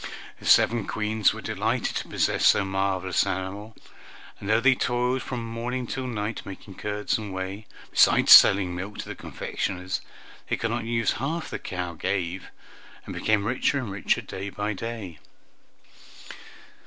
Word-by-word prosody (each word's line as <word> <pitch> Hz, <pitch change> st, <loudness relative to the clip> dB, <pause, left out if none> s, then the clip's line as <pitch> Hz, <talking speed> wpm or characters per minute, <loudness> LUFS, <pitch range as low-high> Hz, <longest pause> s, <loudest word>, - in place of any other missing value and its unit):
The -, -, -8 dB
seven 115 Hz, -3 st, +4 dB
Queens 110 Hz, -1 st, +1 dB
were -, -, -8 dB
delighted -, -, -1 dB
to -, -, -4 dB
possess -, -, 0 dB
so 100 Hz, -, +4 dB
marvelous 95 Hz, -1 st, 0 dB
an 95 Hz, -2 st, -1 dB
animal, 100 Hz, +4 st, -7 dB, 0.6 s
and 100 Hz, -, -6 dB
though 110 Hz, +1 st, +4 dB
they 130 Hz, +3 st, +5 dB
toiled 125 Hz, +1 st, 0 dB
from 120 Hz, -3 st, -5 dB
morning 120 Hz, +2 st, -3 dB
till 130 Hz, +2 st, -4 dB
night 110 Hz, -2 st, -3 dB
making 95 Hz, +1 st, -10 dB
curds 105 Hz, +3 st, -2 dB
and 105 Hz, -2 st, -6 dB
whey, 95 Hz, +3 st, -5 dB, 0.2 s
besides -, -, +5 dB
selling 95 Hz, -2 st, +8 dB
milk 95 Hz, +4 st, -6 dB
to -, -, -5 dB
the -, -, -5 dB
confectioners, 90 Hz, 0 st, -4 dB, 0.5 s
they -, -, +1 dB
could 115 Hz, -, -2 dB
not 115 Hz, -1 st, -2 dB
use 115 Hz, -1 st, +1 dB
half 160 Hz, +5 st, -3 dB
the -, -, -4 dB
cow 90 Hz, -2 st, -4 dB
gave, 90 Hz, +2 st, -3 dB, 0.6 s
and -, -, -6 dB
became 110 Hz, -2 st, +1 dB
richer 125 Hz, +4 st, +1 dB
and 125 Hz, -7 st, -3 dB
richer 95 Hz, -1 st, 0 dB
day 95 Hz, +1 st, -6 dB
by 105 Hz, +2 st, -3 dB
day. 105 Hz, -6 st, -6 dB
105 Hz, 160 wpm, -26 LUFS, 95-115 Hz, 0.6 s, selling